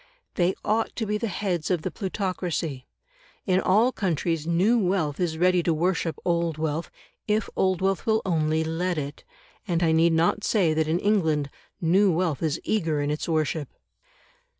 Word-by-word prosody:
They 180 +1 +1
ought 220 +2 0
to 225 - -2
be 210 0 -1
the 230 - -1
heads 180 -5 -2
of 175 -4 0
the - - -2
plutocracy. 180 - -3 0.6
In 185 -2 +2
all 215 +8 +3
countries 165 - -1
new 190 +8 +3
wealth 180 -7 0
is 170 -3 -1
ready 180 +1 +3
to 165 -1 +1
worship 170 0 0
old 170 -2 0
wealth, 155 +1 -2 0.4
if 215 0 +1
old 185 -1 +1
wealth 195 +2 0
will 220 0 +2
only 160 -3 +1
let 170 +2 -2
it, 145 -1 -5 0.4
and 175 -2 0
I 165 - +3
need 165 +1 +4
not 170 +6 +2
say 180 -8 +2
that 155 0 0
in 160 +2 +1
England 160 -8 +1 0.3
new 185 +4 +3
wealth 165 -4 0
is 160 -2 -1
eager 160 -8 0
in 145 0 -1
its 150 +3 -3
worship. 155 -2 -1
170 Hz, 175 wpm, -25 LUFS, 160-190 Hz, 0.6 s, need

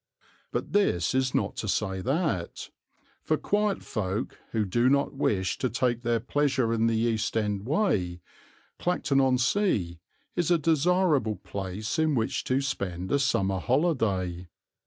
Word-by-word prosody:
But - - -3
this 110 - +2
is 130 0 +1
not - - 0
to - - -3
say 95 -2 -1
that, 135 - -2 0.5
for 155 - 0
quiet 205 +2 0
folk 105 +1 -3
who 110 -2 0
do 120 +7 +2
not 140 +1 +2
wish 95 -9 0
to 130 - 0
take 120 0 0
their 120 -1 +1
pleasure 130 -1 +1
in 115 0 +2
the 115 -1 +1
East 115 -1 0
End 105 -1 -1
way, 100 - +1 0.6
Clacton 150 -6 +1
on 130 -1 +3
Sea 120 - +1 0.4
is 175 -2 0
a 175 - +5
desirable 160 - +2
place 100 - -4
in 155 -2 +2
which 115 -2 -1
to 130 +2 +1
spend 95 -9 -3
a 140 - +3
summer 95 -8 +1
holiday. 100 - 0
120 Hz, 150 wpm, -27 LUFS, 100-145 Hz, 0.6 s, a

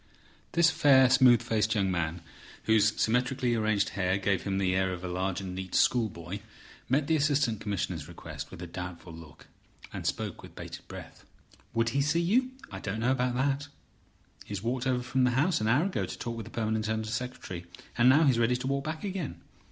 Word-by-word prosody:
This 170 -1 +5
fair, 135 -5 +5
smooth 125 -3 +6
faced 110 0 +1
young 95 -2 +1
man, 85 -1 -2 0.4
whose 110 0 +3
symmetrically 125 +2 +1
arranged 110 -3 +1
hair 95 -1 0
gave 100 -2 0
him 95 -1 -2
the 95 -1 +1
air 95 0 +1
of 90 0 -6
a - - -3
large 90 +1 -2
and 95 -1 -5
neat 95 0 -5
schoolboy, 100 -6 +1 0.5
met 140 +3 +2
the 160 - +2
Assistant 140 -7 +1
Commissioner's 90 -6 -3
request 85 - -8
with 85 - -9
a - - -4
doubtful 90 -1 -7
look, 80 -2 -13 0.5
and - - -4
spoke - - -3
with - - -13
bated - - -9
breath. - - -10 0.5
"Would 115 0 +2
he 140 +4 +1
see 150 +4 +2
you? 230 +10 +2 0.2
I - - -6
don't 105 +3 -4
know 125 +3 +2
about 125 -2 0
that. 140 +2 0 0.8
He - - -22
has 95 - -5
walked 125 +2 -1
over 125 -1 +1
from 130 +1 +1
the 125 0 +2
House 160 -1 +2
an 110 - 0
hour 130 +9 +3
ago 195 - -1
to - - -7
talk 120 -1 -4
with 115 -2 -6
the - - -9
permanent 110 -1 -1
Under 110 0 -1
Secretary, 110 -6 -5 0.3
and 120 +1 +5
now 145 +5 +6
he's 130 -6 +3
ready 120 +1 +3
to 125 +1 -4
walk 140 +1 0
back 155 0 -4
again. 190 -7 -4
115 Hz, 205 wpm, -29 LUFS, 95-135 Hz, 0.8 s, smooth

